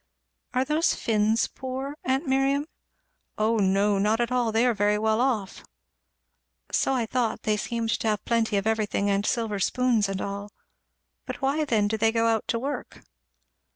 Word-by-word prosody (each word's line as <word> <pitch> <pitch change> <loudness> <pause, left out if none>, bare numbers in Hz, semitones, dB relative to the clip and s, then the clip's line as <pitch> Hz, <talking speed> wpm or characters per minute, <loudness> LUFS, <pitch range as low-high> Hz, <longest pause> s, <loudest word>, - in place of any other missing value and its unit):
"Are 255 +1 +2
those 305 +4 +1
Finns 220 0 +1
poor, 265 +2 -6
aunt 265 +2 0
Miriam?" 270 +1 +1 0.7
"O 220 +2 +2
no 200 0 +2
not 215 +3 +2
at 240 +1 0
all 245 -3 +1
they 225 +3 +2
are 245 - +3
very 205 0 +2
well 220 +2 +1
off." 225 -7 -1 1.1
"So 270 - +1
I 240 -3 0
thought 230 -1 -1
they 215 - +1
seemed 225 +2 -2
to - - -2
have 210 -1 -1
plenty 225 -3 +1
of 195 - -1
everything, 210 -2 0
and 200 0 +1
silver 225 -5 -1
spoons 230 -1 +1
and 195 -1 -3
all. 200 +1 -5 0.8
But - - -5
why 290 +3 +1
then 220 -7 +2
do 220 +1 -1
they 225 +1 +3
go 230 0 +1
out 225 -1 +1
to 230 - 0
work?" 275 +5 -5
225 Hz, 175 wpm, -26 LUFS, 210-255 Hz, 1.1 s, are